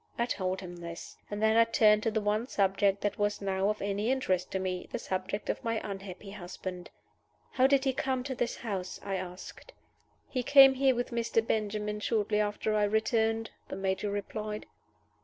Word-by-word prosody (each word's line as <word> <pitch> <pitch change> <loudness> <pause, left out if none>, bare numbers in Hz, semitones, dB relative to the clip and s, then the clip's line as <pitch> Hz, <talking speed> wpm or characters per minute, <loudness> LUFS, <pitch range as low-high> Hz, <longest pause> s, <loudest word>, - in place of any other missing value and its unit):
I 235 - +2
told 190 -5 -2
him 175 -2 -8
this. 170 -1 -8
And 205 +1 -3
then 220 0 +4
I 230 - +8
turned 215 -2 +4
to 225 - +1
the 220 0 -1
one 210 +3 0
subject 195 -2 +2
that 205 - -1
was 205 0 +1
now 195 0 0
of 210 -1 -2
any 200 +3 -1
interest 190 -9 0
to - - -2
me 185 -1 -3
the - - -2
subject 195 -1 -3
of - - -2
my 230 -1 0
unhappy 195 0 -7
husband. 180 -2 -7 0.6
"How 260 0 +4
did 275 -1 +3
he 265 -1 +1
come 260 -1 -1
to 265 0 -3
this 240 -1 -1
house?" 195 -5 -4
I 200 - -3
asked. 180 0 -8 0.5
"He 255 - -2
came 270 +1 +8
here 265 -1 +3
with 245 +2 -2
Mr. 230 -1 +1
Benjamin 210 -1 -1
shortly 210 -1 +1
after 210 +1 0
I 210 -1 +3
returned," 220 +1 +1 0.2
the - - -5
Major 195 +1 -1
replied. 210 +1 -4
210 Hz, 190 wpm, -30 LUFS, 195-230 Hz, 0.6 s, I